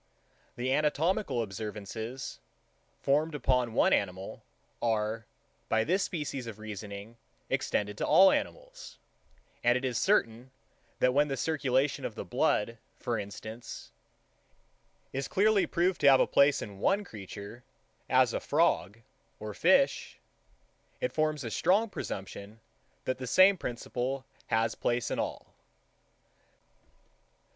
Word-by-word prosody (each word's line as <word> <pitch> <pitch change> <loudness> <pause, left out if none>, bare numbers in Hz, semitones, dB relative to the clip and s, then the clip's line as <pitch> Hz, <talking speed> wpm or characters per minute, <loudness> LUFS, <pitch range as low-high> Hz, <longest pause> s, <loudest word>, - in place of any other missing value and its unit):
The 130 +2 -1
anatomical 155 - +1
observations, 110 +3 -6 0.6
formed 150 +3 +2
upon 125 -4 +1
one - - +4
animal, 95 0 -2 0.4
are, 110 -1 -1 0.4
by 110 0 +3
this 185 - +1
species 145 -9 -3
of 110 -3 -7
reasoning, 105 +1 -8 0.3
extended 105 0 -1
to - - -1
all 190 0 +7
animals; - - -4 0.7
and 120 +1 +4
it 130 - -4
is 125 -2 -1
certain, 125 - +1 0.5
that 125 - +3
when 145 +2 +3
the 135 -2 -3
circulation 135 -2 0
of - - -4
the - - -6
blood, 115 +2 0 0.2
for 120 -2 -2
instance, 110 +3 -8 1.2
is 135 0 -2
clearly 205 0 +3
proved 180 +1 0
to 140 - +7
have 135 -1 +5
place 140 0 +4
in 100 -2 -9
one 200 - +2
creature, 105 - -9 0.5
as - - +4
a - - 0
frog, 95 +7 +1 0.4
or 105 0 -6
fish, 275 - +2 0.8
it - - -2
forms 155 -2 0
a 115 - -4
strong 195 - +3
presumption, 100 - -6 0.5
that 130 - -2
the 130 - -5
same 190 +8 +6
principle 130 -1 -4 0.2
has 115 0 +1
place 120 -1 -1
in - - -1
all. - - -4
125 Hz, 125 wpm, -30 LUFS, 110-150 Hz, 1.2 s, all